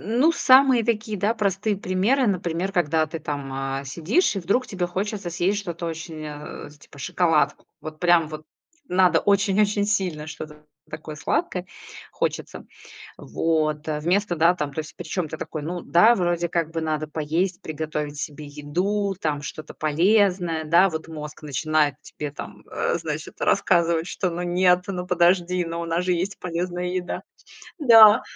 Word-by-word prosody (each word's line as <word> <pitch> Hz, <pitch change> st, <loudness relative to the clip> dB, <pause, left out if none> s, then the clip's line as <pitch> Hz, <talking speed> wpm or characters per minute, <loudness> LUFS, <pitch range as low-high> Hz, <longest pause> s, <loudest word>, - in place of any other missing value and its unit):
Ну 240 Hz, -, +2 dB
самые 260 Hz, -5 st, +5 dB
такие, 215 Hz, -3 st, -1 dB
да, 210 Hz, +5 st, +1 dB
простые 205 Hz, 0 st, 0 dB
примеры, 200 Hz, +8 st, +1 dB
например, 180 Hz, -1 st, -1 dB
когда 160 Hz, -3 st, +1 dB
ты 165 Hz, +2 st, -6 dB
там, 145 Hz, -2 st, -5 dB
а, 135 Hz, 0 st, -3 dB
сидишь 175 Hz, -, +1 dB
и -, -, +1 dB
вдруг 200 Hz, +9 st, 0 dB
тебе 185 Hz, -5 st, -2 dB
хочется 195 Hz, 0 st, -3 dB
съесть 185 Hz, +4 st, 0 dB
что-то 170 Hz, -3 st, -5 dB
очень 160 Hz, -1 st, -6 dB
а, 150 Hz, 0 st, -8 dB
типа, 145 Hz, -1 st, -17 dB
шоколадку. 150 Hz, +1 st, +1 dB
Вот 155 Hz, 0 st, -8 dB
прям 175 Hz, -2 st, +4 dB
вот 155 Hz, 0 st, -8 dB, 0.4 s
надо 180 Hz, 0 st, +4 dB
очень-очень 205 Hz, +1 st, +2 dB
сильно 180 Hz, -7 st, -1 dB
что-то 150 Hz, -1 st, -9 dB, 0.3 s
такое 155 Hz, 0 st, -7 dB
сладкое 180 Hz, -, -1 dB, 0.5 s
хочется. -, -, -3 dB, 0.5 s
Вот, 155 Hz, -2 st, -1 dB
а. 150 Hz, -1 st, -1 dB
Вместо, 180 Hz, +3 st, +1 dB
да, 170 Hz, +3 st, +4 dB
там 145 Hz, -4 st, -3 dB
то -, -, -4 dB
есть, 155 Hz, 0 st, -7 dB
причём, 175 Hz, 0 st, -3 dB
ты 160 Hz, -, -7 dB
такой, 155 Hz, -, -5 dB
ну 175 Hz, +2 st, -4 dB
да, 215 Hz, +8 st, +5 dB
вроде 175 Hz, -2 st, 0 dB
как 165 Hz, -2 st, -1 dB
бы 165 Hz, 0 st, -3 dB
надо 155 Hz, -1 st, -2 dB
поесть, 160 Hz, +4 st, -2 dB
приготовить 150 Hz, -1 st, -4 dB
себе 150 Hz, 0 st, -6 dB
еду, 180 Hz, +8 st, -2 dB
там 150 Hz, -2 st, -1 dB
что-то 155 Hz, +1 st, -8 dB
полезное. 175 Hz, +1 st, +2 dB
Да, 170 Hz, +5 st, +5 dB
вот 160 Hz, -2 st, -5 dB
мозг 150 Hz, -1 st, -8 dB
начинает 150 Hz, 0 st, +1 dB
тебе 150 Hz, -1 st, -7 dB
там, -, -, -9 dB
э, -, -, 0 dB
значит, -, -, -6 dB
рассказывать, 170 Hz, 0 st, +2 dB
что 185 Hz, -1 st, -2 dB
ну 175 Hz, +1 st, -4 dB
нет, 180 Hz, 0 st, +3 dB
ну 180 Hz, -2 st, -3 dB
подожди, 180 Hz, 0 st, +2 dB
но 165 Hz, 0 st, -4 dB
у -, -, -4 dB
нас 165 Hz, +1 st, -1 dB
же 180 Hz, -, +2 dB
есть 185 Hz, +4 st, -3 dB
полезная 180 Hz, 0 st, -3 dB
еда. 180 Hz, 0 st, -3 dB, 0.6 s
Да. 225 Hz, -6 st, +8 dB
175 Hz, 165 wpm, -24 LUFS, 155-190 Hz, 0.6 s, Да